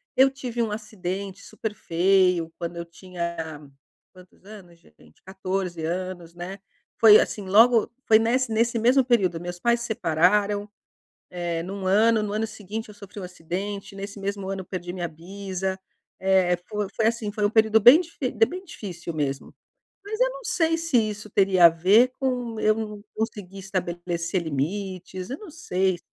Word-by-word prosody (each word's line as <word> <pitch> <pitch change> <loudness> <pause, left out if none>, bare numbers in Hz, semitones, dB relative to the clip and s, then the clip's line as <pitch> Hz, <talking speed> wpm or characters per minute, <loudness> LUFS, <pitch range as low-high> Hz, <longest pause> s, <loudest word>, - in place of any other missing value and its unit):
eu 265 +1 +6
tive 250 -3 -4
um 225 - -1
acidente 200 -2 -5
super 220 -2 -5
feio, 180 -2 +2
quando 170 0 -5
eu 170 - -5
tinha 170 -3 -6 0.5
quantos 185 0 -19
anos 195 -5 -13
gente? 75 - -23
14 185 -3 -3
anos, 175 0 -4
né. 185 +3 -7 0.4
Foi 215 -2 +9
assim 200 -3 -2
logo 225 +3 +5 0.2
foi 220 -1 +6
nesse 235 +2 +1
nesse 230 +2 +1
mesmo 250 +4 +4
período, 195 -9 +1
meus 175 0 -6
pais 235 +2 +2
se 235 - -4
separaram, 205 +2 +1 0.6
eh, 175 -2 -3
num 195 +1 -6
ano 215 +3 +4
no 205 - -3
ano 215 +1 0
seguinte 220 0 -7
eu 210 - -12
sofri 205 0 -10
acidente 190 +3 -5
nesse 200 +1 -7
mesmo 200 -1 -4
ano 195 0 -3
eu - - -7
perdi 175 -1 -6
minha 175 -2 -3
bisa. 190 +3 -5 0.4
Eh, 190 -2 +3
foi 210 -2 -2
foi 220 - +1
assim, 225 -2 -1
foi 210 -1 -1
um 205 - +3
período 220 0 +4
bem 245 +9 +9
dif 335 -2 -9 0.3
bem 365 +6 -7
difícil 175 - -7
mesmo. 140 -3 -3 0.5
Mas 430 +3 -4
eu - - +4
não - - -8
sei 335 -5 +1
se 330 -4 -2
isso 215 -1 -1
teria 190 -3 +4
a - - +11
ver 200 +10 +4
com 245 -4 -2
eu 215 - +4
não 210 -2 -6
consegui 200 -3 -5
estabelecer 175 -2 -3
limites, 185 +4 -4
eu 270 - -4
não 405 -7 -11
sei. 190 - -1
195 Hz, 170 wpm, -25 LUFS, 180-220 Hz, 0.6 s, a